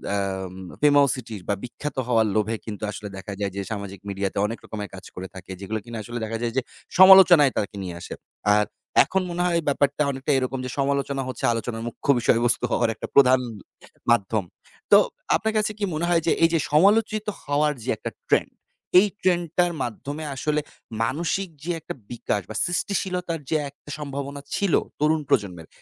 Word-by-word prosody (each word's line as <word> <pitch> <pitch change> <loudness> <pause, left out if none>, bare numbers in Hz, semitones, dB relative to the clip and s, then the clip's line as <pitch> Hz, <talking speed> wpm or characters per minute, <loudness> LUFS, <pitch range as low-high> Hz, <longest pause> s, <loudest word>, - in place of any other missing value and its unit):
আম 95 -2 -3 0.3
famousity 140 -6 +3
বা 100 - +2
বিখ্যাত 145 +4 -6
হওয়ার 115 -3 +3
লোভে 110 +1 +1
কিন্তু 105 -1 -6
আসলে 105 0 -7
দেখা 100 +1 -7
যায় 100 -2 -1
যে 100 - -2
সামাজিক 100 -2 -5
মিডিয়াতে 100 -1 -3
অনেক 115 +2 -3
রকমের 105 -2 -6
কাজ 95 - -11
করে 95 +1 -6
থাকে। 95 0 -9
যেগুলো 110 +3 -3
কিনা 115 -1 -7
আসলে 120 +3 -5
দেখা 115 +1 -3
যায় 115 -1 -1
যে - - +4 0.4
সমালোচনায় 180 -7 +9
তাকে 100 -1 -2
নিয়ে 90 -2 -5
আসে। - - -7 0.4
আর 105 0 +3 0.4
এখন 190 0 0
মনে 175 +1 -2
হয় 170 -1 +2
ব্যাপারটা 145 +1 +2
অনেকটা 135 +2 -2
এরকম 130 0 -1
যে - - -4
সমালোচনা 140 0 0
হচ্ছে 130 - -6
আলোচনার 115 0 -4
মুখ্য 120 - -8
বিষয়বস্তু 120 +1 +2
হওয়ার 120 -2 +2
একটা - - -6
প্রধান 130 -2 +7 0.7
মাধ্যম। 110 -2 +2 0.5
তো - - +10 0.4
আপনার 220 +1 0
কাছে 215 0 +1
কি - - -3
মনে 160 +3 -1
হয় 170 -1 +3
যে - - +4
এইযে 165 -1 +4
সমালোচিত 210 +6 +4 0.2
হওয়ার 150 +1 +1
যে 130 - -5
একটা - - -5 0.2
ট্রেন্ড, - - +2 0.5
এই 205 - +4
ট্রেন্ডটার 175 -1 +2
মাধ্যমে 145 +6 -5
আসলে 150 +3 0 0.4
মানসিক 170 +9 -1
যে 175 - -2
একটা - - -7 0.2
বিকাশ 110 -3 -2
বা - - -7
সৃষ্টিশীলতার 180 -2 -1
যে 160 - +2
একটা 145 +1 -18
সম্ভাবনা 140 0 -5
ছিল 200 -5 0 0.3
তরুণ 155 +1 +2
প্রজন্মের, 90 -7 0
135 Hz, 170 wpm, -24 LUFS, 110-165 Hz, 0.7 s, তো